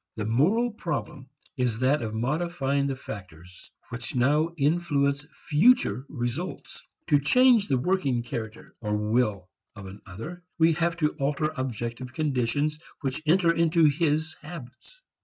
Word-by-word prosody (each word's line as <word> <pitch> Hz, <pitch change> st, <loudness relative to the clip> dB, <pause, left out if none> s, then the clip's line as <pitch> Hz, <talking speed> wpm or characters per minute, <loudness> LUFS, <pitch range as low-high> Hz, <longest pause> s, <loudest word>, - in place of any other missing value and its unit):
The 105 Hz, -, -3 dB
moral 185 Hz, -, +2 dB
problem 155 Hz, -, -5 dB, 0.3 s
is 125 Hz, -4 st, 0 dB
that 130 Hz, +5 st, +2 dB
of 110 Hz, -1 st, -4 dB
modifying 140 Hz, +2 st, 0 dB
the 135 Hz, -, -2 dB
factors 90 Hz, -7 st, -10 dB, 0.2 s
which 125 Hz, 0 st, -6 dB
now 145 Hz, +6 st, +3 dB
influence 145 Hz, -2 st, +1 dB
future 165 Hz, -, +2 dB
results. 130 Hz, +7 st, -5 dB, 0.3 s
To 145 Hz, -3 st, +5 dB
change 235 Hz, -, +4 dB
the 135 Hz, -, +2 dB
working 135 Hz, -5 st, 0 dB
character 110 Hz, -2 st, -7 dB
or 105 Hz, -1 st, -1 dB
will 105 Hz, -3 st, 0 dB, 0.3 s
of 100 Hz, -3 st, -9 dB
another 105 Hz, -, -9 dB, 0.2 s
we 165 Hz, -1 st, +5 dB
have 170 Hz, +1 st, 0 dB
to 155 Hz, -3 st, +2 dB
alter 150 Hz, +2 st, 0 dB
objective 125 Hz, 0 st, -4 dB
conditions 145 Hz, +1 st, 0 dB, 0.2 s
which 135 Hz, +2 st, -3 dB
enter 170 Hz, 0 st, +4 dB
into 165 Hz, 0 st, +3 dB
his 155 Hz, +1 st, +1 dB
habits. 165 Hz, -, -11 dB
140 Hz, 135 wpm, -26 LUFS, 120-165 Hz, 0.3 s, To